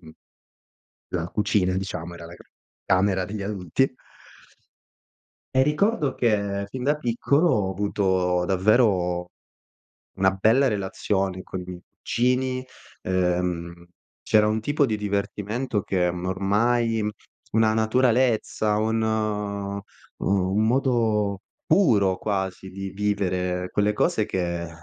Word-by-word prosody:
mhmm 80 -2 -14 1.0
la 85 -1 -1
cucina, 100 -3 +1
diciamo, 90 -3 -4
era 85 -1 -10
la 85 - -11 0.5
camera 95 0 +2
degli 100 +3 -6
adulti. 100 - -1 1.6
E 130 - +6
ricordo 150 - +1
che 100 -4 0
fin 130 +3 -6
da 145 +3 +2
piccolo 140 +5 +1
ho 100 - +1
avuto 95 -2 0
davvero 95 -3 +2 0.9
una 95 0 +4
bella 110 +8 +3
relazione 95 -2 -2
con 95 - -6
i 90 - -6
miei 90 -1 -8 0.2
cugini, 130 +1 0 0.4
ehm, 90 -2 -1 0.4
c'era 105 -2 +4
un 110 +1 0
tipo 145 +4 +1
di 110 -2 -1
divertimento 105 +3 -2
che 90 -2 0
m 90 0 -6
ormai, 110 +4 +1 0.5
una 110 0 +3
naturalezza, 110 -2 +2
un, 110 +1 +1
uhm, 105 -2 -2 0.4
un 95 +2 +1
modo 110 -6 +1 0.3
puro 105 - +3
quasi 95 -2 -3
di 95 0 -6
vivere 90 -3 -1
quelle 105 +1 +2
cose 105 0 +1
che, 85 -4 -2
100 Hz, 115 wpm, -24 LUFS, 95-110 Hz, 1.6 s, E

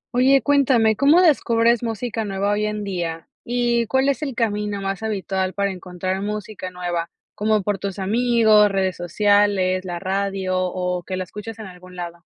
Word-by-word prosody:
Oye, 265 +1 +4
cuéntame, 255 -6 +3
¿cómo 285 - +5
descubres 235 -7 +3
música 225 0 -3
nueva 200 0 -1
hoy 210 +1 0
en 210 0 -3
día? 170 -4 -4 0.2
¿Y 240 -1 0
cuál 265 +3 +2
es 280 - -1
el 275 -5 -3
camino 210 -3 -1
más 195 0 -3
habitual 190 -3 -2
para 200 0 0
encontrar 185 +1 -4
música 210 -2 -5
nueva?, 175 -2 -3 0.2
como 215 -1 +1
por 205 0 -1
tus 195 0 -4
amigos, 220 0 +4
redes 190 -2 0
sociales, 190 +1 +2
la 175 -1 -4
radio, 195 0 -2
o 180 0 -2
que 185 +1 -5
la 185 - -2
escuchas 210 +4 -9
en 220 - -8
algún 180 -1 -13
lado. 170 -1 -7
205 Hz, 170 wpm, -22 LUFS, 185-225 Hz, 0.2 s, cómo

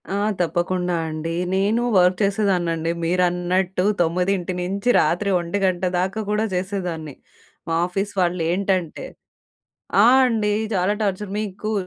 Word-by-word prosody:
ఆ! 200 - -1 0.2
తప్పకుండా 180 +1 -1
అండి. 160 +1 -4 0.2
నేనూ 205 +5 +1
వర్క్ 180 0 +4
చేసేదాన్నండి. 180 -5 0
మీరన్నట్టు 180 +1 0 0.2
తొమ్మిదింటి 180 +2 0
నుంచి 195 +6 -2
రాత్రి 175 +6 +1
1 185 +1 -1 0.2
దాకా 190 +4 -1
కూడా 210 +1 +1
చేసేదాన్ని. 180 -6 -4 0.5
మా 165 - -1
ఆఫీస్ 195 +3 -3
వాళ్ళేంటంటే. 180 0 -1 1.0
ఆ! - - +7 0.2
అండి. 215 -3 0 0.2
చాలా 190 +3 +1
టార్చర్. 200 0 -2
మీకు 215 +1 -4
185 Hz, 110 wpm, -22 LUFS, 175-200 Hz, 1.0 s, ఆ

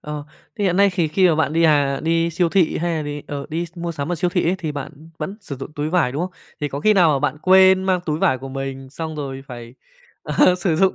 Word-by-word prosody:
Ờ, 150 -1 -6 0.3
thì 205 - 0
hiện 180 -1 +1
nay 200 0 +5
thì 175 -3 0
khi 185 +4 +3
mà 160 - +3
bạn 155 -1 0
đi, 165 - +2
à, 145 -4 +3
đi 165 +1 +1
siêu 170 +1 +1
thị 180 -2 +2
hay 170 0 -1
là 155 - -2
đì 145 0 -5
ờ, 140 -1 -5
đi 170 +2 -3
s 170 - -21
mua 170 0 -3
sắm 150 +2 -3
ở - - +1
siêu 175 +2 -1
thị 180 0 +1
ấy, 180 - +2
thì 160 -4 -4
bạn 145 +2 -8
vẫn 190 +6 -5
sử 145 -9 -7
dụng 135 +3 -8
túi 150 0 -3
vải, 170 -8 +2
đúng 145 +5 -2
không? 185 - -3 0.3
Thì 145 - -1
có 140 0 -5
khi 215 +7 +4
nào 180 -5 +5
mà 140 - +1
bạn 145 +1 -1
quên 190 0 +6
mang 185 -1 +1
túi 150 0 -1
vải 130 -5 +2
của 135 +1 -8
mình, 135 0 -6
xong 160 +1 -6
rồi 135 -2 -5
phải, 120 -2 -10 0.5
ờ, 180 - +3
sử 175 -3 0
dụng 190 +1 +3
160 Hz, 285 wpm, -21 LUFS, 145-180 Hz, 0.5 s, quên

